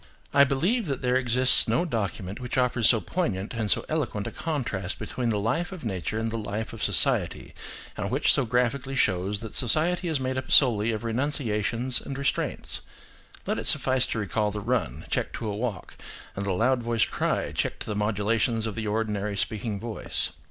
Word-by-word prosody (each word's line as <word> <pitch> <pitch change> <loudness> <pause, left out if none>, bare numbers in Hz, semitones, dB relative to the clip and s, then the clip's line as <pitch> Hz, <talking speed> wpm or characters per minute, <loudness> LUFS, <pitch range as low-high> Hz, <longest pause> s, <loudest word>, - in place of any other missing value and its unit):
I 140 - +7
believe 175 - 0
that 135 -3 -3
there 125 0 +2
exists 130 0 +4
no 120 +11 +2
document 105 - -3
which 125 +1 -4
offers 125 -3 +3
so 115 - +4
poignant 105 - -2
and 110 -3 -2
so - - +1
eloquent 130 -10 -2
a - - -4
contrast 115 - -3
between 120 +3 -3
the 110 - +1
life 160 - -1
of 185 -8 -8
nature 95 -1 -3
and 110 0 -1
the 115 - -3
life 105 +2 -4
of 115 - -8
society, - - +2 0.4
and 100 -2 -3
which 135 +6 +3
so 135 - +4
graphically 125 +3 0
shows 100 -3 +1
that 115 - -7
society 160 - +2
is 160 -4 0
made 130 0 -1
up 130 - -8
solely 115 -5 +5
of 110 0 -4
renunciations 120 -1 0
and 135 - -6
restraints. 140 0 -1 0.6
Let - - -1
it - - -1
suffice 130 -1 +2
to - - -3
recall 105 +1 0
the 105 0 -4
run, 100 - -2
checked - - -2
to 115 - -4
a 105 - -2
walk, 105 -5 -4 0.4
and 100 0 -3
the 95 - +1
loud 125 +6 +2
voiced 115 -1 0
cry, - - -1
checked - - -2
to - - -4
the 105 - -3
modulations 110 +2 0
of 110 - -3
the 110 0 -4
ordinary 105 -1 -1
speaking 105 0 -2
voice. 115 0 -2
115 Hz, 195 wpm, -26 LUFS, 105-130 Hz, 0.6 s, I